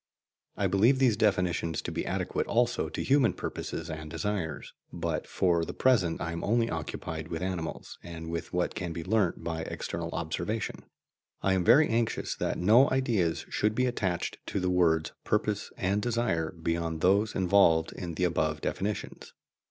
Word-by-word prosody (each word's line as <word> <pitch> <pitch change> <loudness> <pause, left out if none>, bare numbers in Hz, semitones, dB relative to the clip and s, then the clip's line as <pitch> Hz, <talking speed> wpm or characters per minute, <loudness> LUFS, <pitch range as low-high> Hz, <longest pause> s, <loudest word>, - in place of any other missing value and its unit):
I - - 0
believe 115 +7 +4
these 130 -5 +4
definitions 90 -6 +1
to - - -4
be - - -3
adequate - - -1
also 120 +1 +1
to - - -4
human 130 -8 +3
purposes - - -5
and 80 -1 -6
desires, 95 -3 -3 0.2
but 85 -2 -3
for 85 -3 +2
the - - -5
present 110 -11 +2
I 80 - -3
am 85 - -4
only 115 +2 +2
occupied 80 0 -4
with 85 +1 -4
animals 90 -3 -4
and 80 -1 -8
with 85 - -4
what 90 0 0
can 90 -3 -4
be 85 0 -5
learnt 95 -4 +1
by 80 -1 -3
external 85 +1 -4
observation. 90 +6 -3 0.6
I 95 - +3
am 95 -1 +1
very 145 - +6
anxious 115 0 0
that - - -1
no 110 +9 +5
ideas 115 -11 +1
should 105 +1 0
be 125 - +2
attached 95 -8 -2
to - - -1
the 90 0 0
words 80 -3 +2
"purpose" 105 -1 0
and 100 +2 0
"desire" 110 -9 0
beyond 85 -1 -2
those 100 +4 +3
involved 90 -4 +4
in 85 -3 -6
the 90 - -1
above 80 -3 +1
definitions. 105 +2 -4
90 Hz, 170 wpm, -29 LUFS, 85-110 Hz, 0.6 s, very